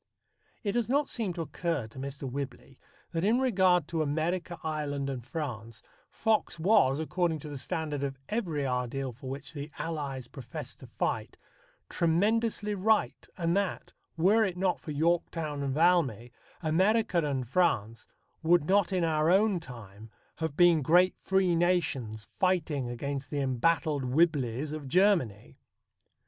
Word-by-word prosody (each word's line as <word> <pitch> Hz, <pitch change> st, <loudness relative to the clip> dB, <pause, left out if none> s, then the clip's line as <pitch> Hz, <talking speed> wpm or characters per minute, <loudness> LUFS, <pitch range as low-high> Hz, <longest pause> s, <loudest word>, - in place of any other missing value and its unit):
It 205 Hz, -, 0 dB
does 235 Hz, +1 st, -1 dB
not 285 Hz, +2 st, +2 dB
seem 220 Hz, -6 st, -3 dB
to 170 Hz, -1 st, -3 dB
occur 165 Hz, -5 st, -2 dB
to 110 Hz, +4 st, -11 dB
Mr. 140 Hz, +1 st, -6 dB
Whibley 135 Hz, 0 st, -6 dB, 0.3 s
that 165 Hz, 0 st, -2 dB
in 220 Hz, +5 st, +3 dB
regard 185 Hz, -, +3 dB
to 165 Hz, -2 st, -1 dB
America, 170 Hz, +4 st, -1 dB
Ireland, 145 Hz, -3 st, -2 dB
and 125 Hz, -3 st, -5 dB
France, 115 Hz, -5 st, -6 dB, 0.3 s
Fox 220 Hz, -5 st, 0 dB
was, 160 Hz, -6 st, +4 dB
according 165 Hz, +1 st, 0 dB
to 150 Hz, -, -8 dB
the 145 Hz, -, -6 dB
standard 150 Hz, 0 st, -3 dB
of 135 Hz, -1 st, -3 dB
every 170 Hz, -11 st, -2 dB
ideal 130 Hz, +1 st, -2 dB
for 130 Hz, +2 st, -9 dB
which 140 Hz, +3 st, -6 dB
the 145 Hz, 0 st, -6 dB
Allies 140 Hz, -6 st, -4 dB
professed 125 Hz, -2 st, -8 dB
to -, -, -12 dB
fight, -, -, -3 dB, 0.5 s
tremendously 210 Hz, +5 st, +1 dB
right, 215 Hz, +2 st, +1 dB
and 170 Hz, -1 st, 0 dB
that, 200 Hz, -1 st, -2 dB, 0.2 s
were 200 Hz, +7 st, +4 dB
it 185 Hz, -4 st, -2 dB
not 185 Hz, -1 st, +1 dB
for -, -, -10 dB
Yorktown 160 Hz, -1 st, 0 dB
and 135 Hz, -1 st, -2 dB
Valmy, 150 Hz, -, +2 dB, 0.3 s
America 190 Hz, +4 st, +2 dB
and 135 Hz, -4 st, -2 dB
France 115 Hz, -, 0 dB, 0.3 s
would 165 Hz, -1 st, +3 dB
not 200 Hz, -1 st, +3 dB
in 185 Hz, -2 st, +1 dB
our 155 Hz, -1 st, +2 dB
own 195 Hz, +1 st, +4 dB
time 110 Hz, -, -11 dB, 0.3 s
have 160 Hz, -3 st, -3 dB
been 175 Hz, -3 st, +6 dB
great 175 Hz, +6 st, +4 dB
free 190 Hz, -2 st, +2 dB
nations 150 Hz, -11 st, 0 dB
fighting 160 Hz, -9 st, +1 dB
against 140 Hz, +3 st, -4 dB
the 145 Hz, -, -2 dB
embattled 140 Hz, +2 st, +1 dB
Whibleys 140 Hz, -1 st, +1 dB
of 150 Hz, -3 st, -6 dB
Germany. 140 Hz, -, +1 dB
160 Hz, 150 wpm, -29 LUFS, 135-180 Hz, 0.5 s, been